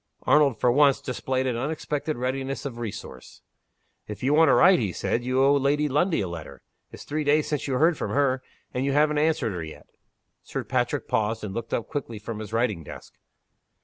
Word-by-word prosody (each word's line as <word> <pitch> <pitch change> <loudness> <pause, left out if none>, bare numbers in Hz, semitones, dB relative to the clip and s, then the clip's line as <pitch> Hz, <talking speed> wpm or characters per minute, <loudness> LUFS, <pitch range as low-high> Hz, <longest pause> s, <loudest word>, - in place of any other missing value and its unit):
Arnold, 145 -5 +3
for 125 - +3
once, 140 +1 +4
displayed 130 +1 -2
an 125 -2 0
unexpected 150 +3 -3
readiness 135 +2 -3
of 120 -4 -5
resource. 100 - -8 0.6
"If 105 +1 -8
you 135 +3 +2
want 160 +1 +5
to - - +5
write," 185 +1 +6
he 105 -6 -1
said, 120 +6 -2
"you 130 +1 +1
owe 140 +1 +5
Lady 145 +2 +2
Lundie 155 - +1
a 95 - -2
letter. 85 -3 -9 0.3
It's - - -10
three 150 +1 -2
days 150 +1 +2
since 150 -2 -2
you 135 - -1
heard 160 +4 +3
from - - -2
her 135 -2 +1 0.3
and 125 - -1
you 140 0 0
haven't 150 +1 +3
answered 155 -9 +1
her 85 -2 -4
yet." 80 - -10 0.6
Sir - - -5
Patrick - - -1
paused, 110 +1 -1
and 100 -2 -5
looked 115 +1 -5
up 115 - -2
quickly 140 -7 -5
from 110 +1 -6
his 110 -1 -7
writing 115 -7 0
desk. - - -11
130 Hz, 205 wpm, -25 LUFS, 115-150 Hz, 0.6 s, write